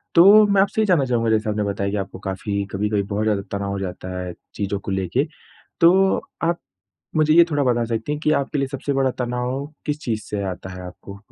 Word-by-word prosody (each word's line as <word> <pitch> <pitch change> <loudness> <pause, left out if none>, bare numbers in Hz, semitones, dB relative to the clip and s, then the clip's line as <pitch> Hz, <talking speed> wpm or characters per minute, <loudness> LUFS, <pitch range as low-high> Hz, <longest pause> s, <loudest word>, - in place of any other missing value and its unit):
तो 205 +5 +8
मैं 200 -1 +4
आपसे 205 +2 +1
ये - - +3
जानना 170 -9 +3
चाहूँगा 115 -2 +1
जैसे 110 0 +1
आपने 105 0 0
बताया 100 -1 -1
कि 105 - -2
आपको 95 -1 -5
काफ़ी 100 +1 -3
कभी-कभी 105 +1 0
बहुत 100 +2 -2
ज़्यादा 105 -2 +1 0.2
तनाव 100 0 -3
हो 100 - -3
जाता 90 -1 -5
है 90 -1 -5 0.2
चीज़ों 100 -1 -2
को 100 - -6
लेके, 95 - 0 0.6
तो 190 +3 +5 0.3
आप 170 +1 +1 0.6
मुझे 155 0 +4
ये 170 - +8
थोड़ा 145 -2 +1
बता 120 -2 +2
सकती 115 +5 -2
हैं 150 - -3
कि 155 - +1
आपके 140 +1 -1
लिए 135 -1 0
सबसे 140 +1 -3
बड़ा 135 -1 +2
तनाव 125 +3 -2 0.2
किस 150 0 -1
चीज़ 110 -3 -2
से 100 -1 -4
आता 95 +1 -7
है 90 0 -8
आपको 100 +2 -10
115 Hz, 225 wpm, -22 LUFS, 100-145 Hz, 0.6 s, तो